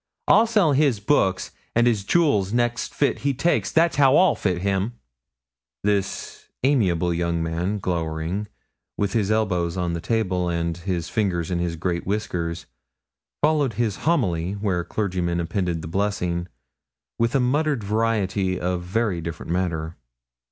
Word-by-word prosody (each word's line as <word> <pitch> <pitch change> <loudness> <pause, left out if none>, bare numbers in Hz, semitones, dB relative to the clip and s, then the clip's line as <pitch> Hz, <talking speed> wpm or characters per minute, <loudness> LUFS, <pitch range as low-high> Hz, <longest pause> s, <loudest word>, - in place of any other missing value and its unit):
I'll 230 - +6
sell 210 -9 +3
his 140 -5 +3
books 100 -5 +1 0.2
and 120 +1 +4
his 110 -5 +2
jewels 105 - +2
next 120 0 0
fit 140 - 0
he 140 -1 0
takes 170 +6 +1
that's 165 -1 +3
how 140 -1 +6
I'll 185 -3 +5
fit 90 -3 -2
him.' 100 +3 0 0.9
This 100 -1 -2 0.2
amiable 90 - +2
young 85 -1 -1
man, 85 +5 -1
glowering, 85 +2 -2 0.5
with 100 -1 -1
his 105 -4 +1
elbows 95 -6 0
on 90 -1 -1
the 85 - -3
table 95 -6 0
and 85 -1 -1
his 85 -1 -3
fingers 95 -6 -1
in 85 - 0
his 85 -1 -1
great 85 +1 -2
whiskers, 85 -5 -2 0.8
followed 150 -5 +3
his 110 -1 -1
homily, 95 - 0
where 100 -4 -1
clergymen 90 -4 -1
append 85 +2 -1 0.2
the - - -5
blessing, 90 -2 -1 0.7
with 115 +2 +1
a - - +4
muttered 140 0 +1
variety 100 -3 0
of 90 0 -1
very 95 0 -1
different 85 0 -6
matter. 85 -2 -2
95 Hz, 145 wpm, -23 LUFS, 85-115 Hz, 0.9 s, I'll